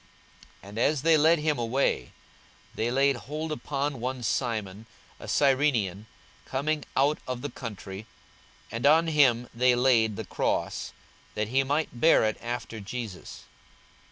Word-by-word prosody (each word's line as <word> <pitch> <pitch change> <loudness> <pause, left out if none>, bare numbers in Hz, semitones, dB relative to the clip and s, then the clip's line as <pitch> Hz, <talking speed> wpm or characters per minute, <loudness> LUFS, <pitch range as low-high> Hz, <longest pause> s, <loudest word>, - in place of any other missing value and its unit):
42:023:026 100 - -11
And 105 +3 -6
as 145 +3 +2
they 165 0 +5
led 160 +2 +5
him 150 -3 0
away, 115 - 0 0.6
they 115 - -1
laid 135 +2 +3
hold 155 +5 -5
upon 145 -2 -3
one 125 +1 -4
Simon, 110 -3 -2 0.3
a - - -9
Cyrenian, 130 -8 +1 0.4
coming 150 +3 -2
out 145 +3 +3
of 125 -1 -4
the 145 - -4
country, 105 -3 -8 0.6
and 115 +5 0
on 160 +3 +5
him 135 -7 +3
they 125 +1 +3
laid 120 -4 +3
the - - -5
cross, - - -2 0.4
that 105 0 -2
he 135 +3 +3
might 140 -2 -2
bear 165 - +6
it 110 -1 -1
after 120 -1 -5
Jesus. 105 -2 -7
125 Hz, 145 wpm, -27 LUFS, 115-145 Hz, 0.6 s, bear